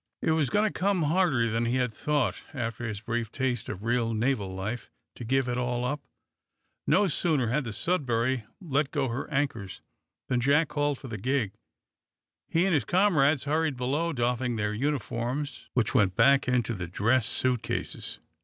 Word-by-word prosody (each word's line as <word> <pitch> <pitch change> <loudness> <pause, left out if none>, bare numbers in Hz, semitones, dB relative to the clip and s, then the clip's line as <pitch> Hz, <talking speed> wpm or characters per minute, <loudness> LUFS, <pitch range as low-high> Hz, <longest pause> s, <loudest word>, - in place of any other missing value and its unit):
It - - +2
was 155 -5 +2
going 210 +8 +2
to - - -4
come 190 -2 +1
harder 150 -7 +2
than 115 +1 0
he 120 +2 0
had 125 -3 0
thought, 145 +3 0
after 120 -2 -3
this 105 -2 -5
brief 115 0 -2
taste 125 -4 -2
of 95 - -6
real 115 -1 +1
naval 110 -3 0
life, 100 +6 -4 0.2
to - - -9
give 130 +2 +1
it 125 0 -1
all 125 0 -1
up! 145 +3 -2 0.9
No 190 +7 +4
sooner 150 -7 +1
had 135 +3 0
the 115 - -4
"Sudbury" 125 - 0 0.2
let 150 -6 0
go 140 -4 -1
her 120 +4 -4
anchors 135 - -2 0.5
than 125 - +1
Jack 145 +4 +3
called 145 -1 0
for 135 - -10
the 110 -4 -5
gig. 125 -2 0 1.0
He 170 +3 +2
and 195 - +2
his 145 -6 +3
comrades 155 - +3
hurried 155 -1 0
below, 145 +7 0
doffing 125 -2 0
their 105 -1 -1
uniforms, 135 +2 -2
which 120 -4 +1
went 95 -3 +3
back 140 +4 +5
into 125 -2 +1
the 90 -5 -4
dress 115 +7 +2
suit 125 -3 +1
cases. - - -4
130 Hz, 180 wpm, -28 LUFS, 115-145 Hz, 1.0 s, back